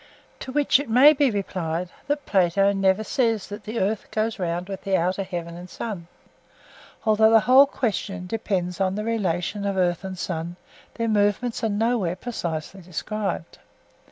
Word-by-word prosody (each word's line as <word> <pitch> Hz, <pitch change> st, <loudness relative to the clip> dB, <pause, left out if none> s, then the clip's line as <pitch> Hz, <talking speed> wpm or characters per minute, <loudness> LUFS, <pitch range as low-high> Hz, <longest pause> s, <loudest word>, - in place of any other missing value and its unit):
To 260 Hz, -, -6 dB
which 290 Hz, 0 st, +3 dB
it 285 Hz, -4 st, -5 dB
may 265 Hz, +7 st, +7 dB
be 280 Hz, -2 st, +3 dB
replied 180 Hz, -5 st, -3 dB, 0.2 s
that 290 Hz, 0 st, -1 dB
Plato 195 Hz, +1 st, +3 dB
never 195 Hz, +1 st, +2 dB
says 225 Hz, -2 st, 0 dB
that 205 Hz, +1 st, -8 dB
the 220 Hz, +2 st, -3 dB
earth 200 Hz, +2 st, -1 dB
goes 215 Hz, 0 st, -1 dB
round 175 Hz, 0 st, -2 dB
with 195 Hz, -1 st, -6 dB
the 195 Hz, -1 st, +2 dB
outer 185 Hz, +3 st, 0 dB
heaven 175 Hz, -3 st, -5 dB
and 175 Hz, +1 st, -10 dB
sun; 190 Hz, -7 st, -6 dB, 1.0 s
although 220 Hz, 0 st, +5 dB
the 225 Hz, -1 st, +6 dB
whole 265 Hz, +4 st, +7 dB
question 200 Hz, -7 st, -3 dB
depends 185 Hz, -3 st, -2 dB
on 190 Hz, 0 st, +1 dB
the 210 Hz, -, -3 dB
relation 200 Hz, -3 st, -1 dB
of 200 Hz, -1 st, -1 dB
earth 175 Hz, -1 st, +1 dB
and 190 Hz, -1 st, -6 dB
sun, 170 Hz, -1 st, -4 dB, 0.4 s
their 230 Hz, -1 st, -1 dB
movements 215 Hz, +3 st, +1 dB
are 225 Hz, -, +2 dB
nowhere 210 Hz, -4 st, 0 dB
precisely 180 Hz, -5 st, -5 dB
described. 185 Hz, +1 st, -4 dB
200 Hz, 165 wpm, -24 LUFS, 180-225 Hz, 1.0 s, may